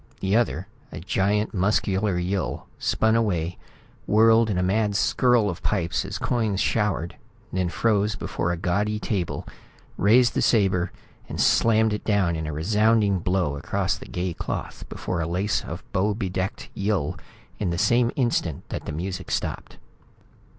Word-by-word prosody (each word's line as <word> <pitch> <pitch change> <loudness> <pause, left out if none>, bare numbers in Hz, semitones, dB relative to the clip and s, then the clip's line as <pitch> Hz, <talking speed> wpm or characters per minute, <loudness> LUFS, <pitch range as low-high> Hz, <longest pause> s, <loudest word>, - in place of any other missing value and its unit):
The 95 +1 0
other, 100 -6 +1 0.2
a - - -6
giant, 100 +3 0
muscular 95 0 +1
Yill, 90 +1 -2
spun 110 0 +2
away, 90 -7 0 0.5
whirled 110 +2 +5
in 100 - 0
a 90 - +1
mad 105 +2 +1
skirl 120 +1 +3
of 90 -4 -4
pipes 85 -5 0
as 100 +1 -4
coins 110 -6 0
showered 105 -7 0 0.4
then 90 -1 0
froze 105 +1 +1
before 85 - -2
a 85 - -2
gaudy 100 +5 0
table, 100 -5 -3 0.5
raised 120 +5 +4
the - - 0
sabre 95 -5 +2 0.4
and - - -5
slammed 110 -1 +4
it 105 - -3
down 100 -6 +1
in 80 -1 -3
a - - -3
resounding 105 +4 +2
blow 90 -4 0
across - - -1
the - - -11
gay 90 0 -3
cloth - - -5
before 90 -2 -3
a 80 - -2
lace 90 +1 0
and - - -6
bow 100 +3 +1
bedecked 95 -2 -3
Yill 100 -7 -1 0.4
in 100 - 0
the 85 - -1
same 120 +5 +3
instant 120 - -1
that - - -5
the - - -4
music 90 +5 -4
stopped. - - -3
100 Hz, 155 wpm, -24 LUFS, 90-110 Hz, 0.5 s, whirled